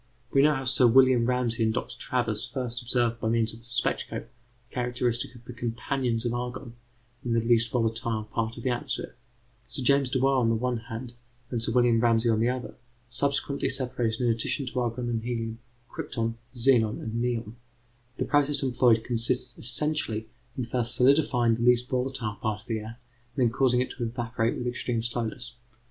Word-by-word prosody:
We 135 - +4
know 150 +1 +5
how 135 - -3
Sir 130 -1 +5
William 130 -1 +5
Ramsay 125 -2 +1
and 110 - +2
Dr. 115 - -4
Travers 120 -5 -1
first 125 -3 -4
observed 120 -1 +1
by 110 - -1
means 115 -1 +1
of 115 - -11
the 115 - -14
spectroscope 120 0 -2 0.4
the - - -26
characteristics 125 -1 -1
of 120 -1 -15
the 125 - -8
companions 120 0 -2
of 120 - 0
argon 125 0 -5 0.5
in 120 - -1
the 115 - +3
least 115 0 +2
volatile 115 -2 -1
part 110 +2 -3
of 120 - -8
the 130 - +1
atmosphere. 130 +1 -3 0.5
Sir 135 - -1
James 140 0 +3
Dewar 135 +1 +2
on 120 -3 +3
the 115 - +2
one 125 +1 -1
hand, 115 +1 -7 0.4
and 120 -3 -1
Sir 115 - +2
William 120 -2 +4
Ramsay 115 0 +3
on 110 - +2
the 115 +2 +2
other, 125 -2 -4 0.4
subsequently 140 +1 0
separated 125 -3 0
in 120 - +2
addition 115 +5 0
to 125 0 -2
argon 120 0 -2
and 115 -2 -1
helium, 115 -1 -3 0.3
crypton, 115 -8 -3 0.2
xenon, 120 -3 +3
and 115 +1 -3
neon. 120 -2 -2 0.6
The - - -1
process 145 -1 +3
employed 120 -3 +3
consists 120 +1 -1
essentially 120 -3 0 0.3
in 125 - -1
first 120 0 -1
solidifying 125 -3 +4
the 115 - -2
least 125 0 +4
volatile 125 -5 -2
part 105 -1 -2
of - - -22
the 115 -3 -2
air 110 +3 -9 0.4
and 130 - +3
then 115 - +2
causing 125 -1 +3
it 130 - -2
to 125 - -5
evaporate 115 0 -1
with 125 - -4
extreme 120 -1 -1
slowness. 120 +1 -3
120 Hz, 190 wpm, -27 LUFS, 115-125 Hz, 0.6 s, know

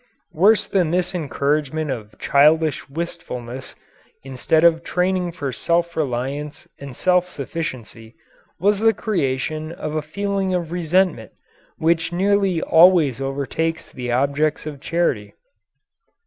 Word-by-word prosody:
Worse 205 +5 +4
than 180 -5 +1
this 180 +2 0
encouragement 150 -2 -1
of 110 -4 -7
childish 155 +2 +3
wistfulness, 135 -6 -6 0.5
instead 135 +4 0
of 165 -1 +4
training 180 0 0
for 145 -6 -5
self 170 0 0
reliance 140 +1 -3
and 140 -3 -9
self 180 +2 +2
sufficiency, 125 -8 -6 0.4
was 200 +3 +2
the 225 0 +3
creation 155 -4 -2
of 160 -3 -5
a 155 - -1
feeling 195 +4 -2
of 170 -2 -3
resentment 175 - 0 0.4
which 165 +1 +1
nearly 195 -1 +1
always 165 -6 +5
overtakes 140 +4 -3
the 125 -1 -5
objects 140 +5 0
of 145 -3 -7
charity. 155 -13 -1
160 Hz, 120 wpm, -21 LUFS, 140-180 Hz, 0.5 s, always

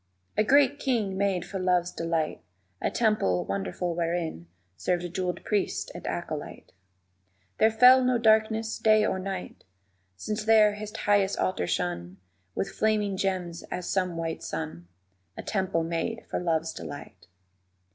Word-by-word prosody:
_ - - -46 0.3
A 215 - +3
great 285 +4 +4
king 225 -9 0
made 190 -2 0
for 190 +2 -5
Love's 180 -1 +1
delight 165 -2 -2 0.4
A - - +1
temple 215 - +1
wonderful 100 - -2
wherein 165 - -2 0.3
Served 175 - -2
jeweled 180 -2 -2
priest 205 -2 -1
and - - -8
acolyte; - - -5 0.9
There 220 - +6
fell 250 +3 +7
no 250 -1 +3
darkness 220 0 +2
day 215 -1 +4
or 190 - -1
night 190 -1 -6 0.5
Since 210 - -3
there 215 -2 +6
his 210 0 -7
highest 200 -1 +2
altar 135 - 0
shone 90 +1 -2 0.4
With 195 - -2
flaming 210 -2 +1
gems 185 -3 -2
as 180 -1 -4
some 185 -3 0
white 165 -1 -3
sun, 150 - -5 0.5
A - - -6
temple 190 -5 0
made 170 +8 -3
for - - -2
Love's 165 -2 0
delight. 110 -10 -9
185 Hz, 145 wpm, -27 LUFS, 165-215 Hz, 0.9 s, fell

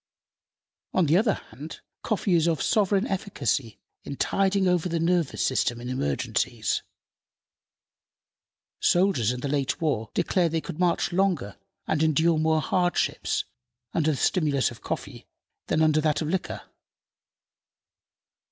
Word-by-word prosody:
On 185 - +4
the 155 +2 +3
other 210 +2 +3
hand, 150 +4 -10 0.2
coffee 205 -3 0
is 165 -1 +3
of 165 -4 +1
sovereign 200 +2 +2
efficacy 140 - -2 0.3
in 140 - -6
tiding 195 +4 +1
over 180 -1 +1
the 165 0 -1
nervous 170 -3 +1
system 120 -2 0
in 120 +1 -6
emergencies. 70 - -1 2.0
Soldiers 175 - +3
in 125 0 -5
the 140 - -2
late 140 +1 -1
war 140 -10 -1
declared 170 -3 +1
they 165 - +2
could 155 - -8
march 175 -1 +1
longer 175 - 0 0.3
and 155 - 0
endure 160 +1 +3
more 160 0 +2
hardships 175 +4 0 0.5
under 160 -1 +2
the 150 - 0
stimulus 145 -7 +1
of 115 - -12
coffee - - -6 0.4
than 160 - +2
under 155 -1 +3
that 155 -1 +1
of 155 - -3
liquor. 190 +2 -2
160 Hz, 135 wpm, -26 LUFS, 140-180 Hz, 2.0 s, On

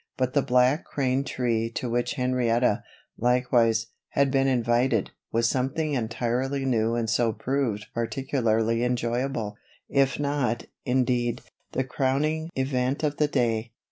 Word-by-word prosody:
But 130 0 0
the 145 - +4
Black 125 +3 +3
Crane 135 -1 0
tree 115 -4 -1
to 125 - -2
which 120 +3 -1
Henrietta, 125 -4 +1 0.4
likewise, 120 -2 +3 0.2
had 140 -1 +2
been 135 0 +3
invited, 120 -3 +2 0.2
was 115 +1 +2
something 135 +5 0
entirely 125 +3 -1
new 115 -3 +1
and 115 -1 -1
so 115 +1 +2
proved 120 -3 -1
particularly 115 -2 0
enjoyable; 120 -2 -1 0.3
if 135 -1 +2
not, 140 -5 0 0.2
indeed, 125 -2 +1 0.3
the 130 - +1
crowning 140 +5 0
event 130 +2 0
of 145 -1 0
the 150 - +3
day. 115 -5 0
125 Hz, 130 wpm, -26 LUFS, 115-135 Hz, 0.4 s, the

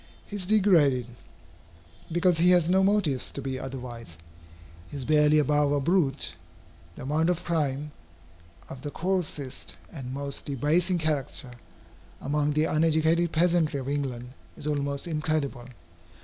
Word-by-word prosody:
He 205 - -8
is 185 -3 -2
degraded, 170 - +4 1.1
because 175 0 +3
he 175 +2 +5
has 175 -3 +5
no 190 +2 +3
motives 190 -10 +1
to - - -5
be 130 -1 -4
otherwise. 120 - -8 0.7
He 145 - -7
is 130 - -4
barely 150 0 +4
above 150 0 +2
a 145 - +2
brute. 145 -3 +1 0.6
The - - -9
amount 155 +5 +1
of 175 -1 -1
crime, 150 -3 -1 0.8
of 130 - -9
the 145 - -4
coarsest 165 -6 -3 0.2
and 130 -5 -7
most 140 +1 -5
debasing 155 +7 +1
character, 150 -4 -2 0.7
among 150 +1 0
the 155 +1 +2
uneducated 160 +2 +2
peasantry 165 -3 +2
of 130 - -6
England, 130 -4 -3 0.3
is - - -5
almost 140 0 -1
incredible. 150 -6 -2
150 Hz, 135 wpm, -27 LUFS, 135-170 Hz, 1.1 s, he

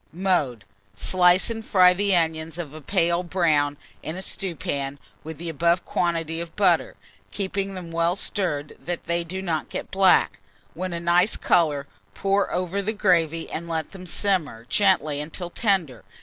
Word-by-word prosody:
Mode. 160 - 0 0.3
Slice 180 - +4
and 225 -1 -5
fry 180 -3 +5
the 200 +1 +1
onions 160 -1 -1
of 160 -5 -6
a 155 - -9
pale 170 0 +1
brown 155 -5 +1 0.2
in 160 - -5
a 190 - -4
stewpan, 140 -8 -4 0.3
with 160 0 -7
the 170 +3 -6
above 170 +3 +1
quantity 165 -1 -1
of 170 -1 -8
butter, 205 - +2 0.3
keeping 195 0 -3
them 175 -3 -7
well 170 +1 +1
stirred, 155 -7 -2
that 175 -1 -4
they 170 +1 -1
do 190 +3 -5
not 160 -4 -2
get - - -6
black. 190 - +4 0.3
When 185 +2 -4
a 170 - -3
nice 175 +4 +3
colour, 150 -5 +2 0.3
pour 195 +1 +1
over 185 +2 -1
the 215 +3 -2
gravy, 165 -6 +1
and 170 +1 -5
let 160 -2 -2
them 185 -1 -10
simmer 170 - 0
gently 155 -8 +2
until 170 +3 -6
tender. 180 - 0
170 Hz, 165 wpm, -24 LUFS, 160-190 Hz, 0.3 s, fry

